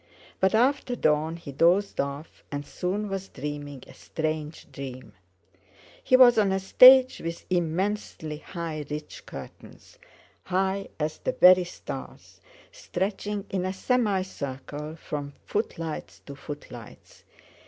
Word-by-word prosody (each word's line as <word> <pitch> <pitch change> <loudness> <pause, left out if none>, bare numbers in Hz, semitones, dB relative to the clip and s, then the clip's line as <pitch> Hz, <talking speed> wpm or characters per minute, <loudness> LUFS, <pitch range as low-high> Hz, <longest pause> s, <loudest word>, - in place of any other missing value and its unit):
But 190 +3 +3
after 250 +1 +2
dawn 155 -4 +1
he 165 -4 -9
dozed 175 +8 +2
off, 140 +3 -7
and 145 0 -4
soon 195 +7 -3
was 195 -1 -4
dreaming 145 -2 -6
a - - -14
strange 155 -1 -4
dream. 130 -5 -8 0.9
He 255 - +5
was 245 -3 +7
on 200 -2 +3
a 190 - +1
stage 255 +6 +8
with 165 0 -5
immensely 175 -2 -1
high 165 -4 -5
rich 150 0 -7
curtains—high 195 - -6
as 155 0 -2
the - - -2
very 180 0 +7
stars—stretching 205 - -6
in 190 -2 -1
a 185 0 -2
semi 205 -2 +1
circle 150 -2 -6
from 145 -3 -6
footlights 160 - -4
to 140 - -9
footlights. 135 -6 -11
175 Hz, 120 wpm, -26 LUFS, 150-200 Hz, 0.9 s, stage